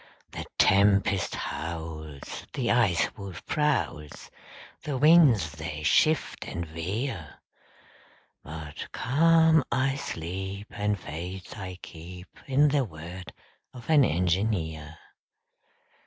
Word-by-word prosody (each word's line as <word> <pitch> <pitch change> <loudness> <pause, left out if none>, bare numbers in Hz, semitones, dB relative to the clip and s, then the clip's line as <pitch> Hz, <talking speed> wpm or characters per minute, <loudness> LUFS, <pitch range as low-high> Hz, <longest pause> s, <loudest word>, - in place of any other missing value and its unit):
The - - -6
tempest 100 -1 +3
howls, 80 -3 -6
The 130 -4 0
Ice 110 -8 +2
Wolf 100 -5 -9
prowls, 135 - -1 0.5
The 145 -3 -3
winds 140 - +6
they 80 -1 -6
shift 155 - +2
and 85 0 -4
veer, 85 - -4 1.1
But 75 0 -8
calm 160 +4 +4
I 130 +2 +2
sleep, 95 - -5
And 105 -1 -1
faith 90 +4 -7
I 95 -3 -7
keep 90 +2 -11
In 145 +2 +4
the 140 -1 +2
word 85 -2 -9 0.4
of 125 +5 -5
an 150 -3 +7
engineer. 85 - 0
95 Hz, 100 wpm, -27 LUFS, 80-130 Hz, 1.1 s, an